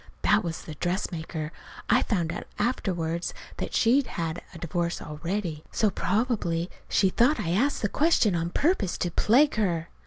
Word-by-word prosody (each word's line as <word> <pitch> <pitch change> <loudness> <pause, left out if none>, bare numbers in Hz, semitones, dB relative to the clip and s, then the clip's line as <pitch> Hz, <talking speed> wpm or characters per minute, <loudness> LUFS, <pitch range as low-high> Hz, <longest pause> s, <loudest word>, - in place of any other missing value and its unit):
(That 210 +1 +4
was 165 -1 -4
the 155 - -7
dressmaker. 160 -2 -3 0.4
I - - +4
found 170 -7 0
out - - -6
afterward 175 -7 -1 0.3
that - - -4
she'd 250 +3 +4
had 165 0 -3
a 175 - -10
divorce 170 +1 -2
already, 165 +1 -4
so 215 -2 +2
probably 190 -7 0 0.2
she 190 - +3
thought 250 +10 +3
I 165 - -1
asked 245 +10 +1
the - - +4
question 270 - +3
on 170 0 0
purpose 255 - +1
to 175 - -1
plague 255 - +4
her.) 170 -6 0
180 Hz, 160 wpm, -27 LUFS, 165-220 Hz, 0.4 s, That